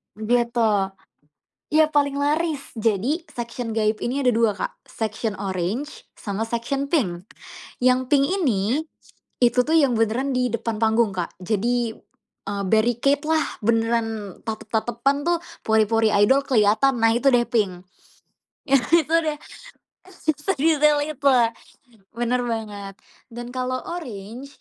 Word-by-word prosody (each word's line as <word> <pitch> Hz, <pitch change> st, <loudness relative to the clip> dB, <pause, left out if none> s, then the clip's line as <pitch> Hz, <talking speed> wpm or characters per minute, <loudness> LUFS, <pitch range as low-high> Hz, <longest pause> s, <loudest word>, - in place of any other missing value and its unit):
Gitu, 235 Hz, +1 st, +1 dB, 1.0 s
ya 310 Hz, +1 st, +5 dB
paling 285 Hz, -2 st, +1 dB
laris 295 Hz, 0 st, -1 dB
jadi 225 Hz, -, 0 dB
section 240 Hz, -2 st, -5 dB
gaib 215 Hz, -1 st, 0 dB
ini 265 Hz, +2 st, -1 dB
ada 250 Hz, -, +4 dB
2 230 Hz, -1 st, +3 dB
Kak, -, -, -5 dB
section 220 Hz, -2 st, -3 dB
oranye 195 Hz, +7 st, -2 dB, 0.3 s
sama 205 Hz, 0 st, -3 dB
section 240 Hz, +5 st, -2 dB
pink, 180 Hz, -, 0 dB, 0.6 s
yang 255 Hz, 0 st, +2 dB
pink 280 Hz, -1 st, +4 dB
ini, 270 Hz, -, 0 dB, 0.6 s
itu 245 Hz, 0 st, +3 dB
tuh 320 Hz, +5 st, +2 dB
yang 275 Hz, -5 st, +3 dB
beneran 230 Hz, +5 st, 0 dB
di 250 Hz, -1 st, +1 dB
depan 230 Hz, -1 st, -3 dB
panggung 220 Hz, -2 st, +2 dB
Kak 175 Hz, -2 st, -3 dB
jadi, 225 Hz, +5 st, -1 dB, 0.6 s
eee, 200 Hz, -1 st, -3 dB
barricade 240 Hz, +7 st, +2 dB
lah 315 Hz, -1 st, +1 dB, 0.2 s
beneran 225 Hz, +1 st, +1 dB, 0.3 s
tatep-tatepan 230 Hz, +4 st, -1 dB
tuh 345 Hz, 0 st, +2 dB, 0.2 s
pori-pori 220 Hz, 0 st, +2 dB, 0.2 s
idol 270 Hz, +5 st, +4 dB
keliatan 235 Hz, +2 st, +3 dB
nah 225 Hz, 0 st, +3 dB
itu 270 Hz, +4 st, +3 dB
deh 240 Hz, -2 st, +3 dB
pink, 195 Hz, -7 st, -1 dB, 0.9 s
nah 245 Hz, -3 st, +2 dB
itu 320 Hz, 0 st, -1 dB
deh, 300 Hz, -1 st, -2 dB, 0.7 s
s 370 Hz, -, -19 dB, 0.2 s
sedetail 300 Hz, -3 st, +3 dB
itu, 285 Hz, -2 st, 0 dB, 0.9 s
bener 240 Hz, +2 st, 0 dB
banget, 210 Hz, -4 st, -5 dB, 0.4 s
dan 240 Hz, 0 st, -7 dB
kalau 255 Hz, 0 st, -3 dB, 0.2 s
oranye 235 Hz, -, -8 dB
240 Hz, 125 wpm, -23 LUFS, 220-275 Hz, 1.0 s, ya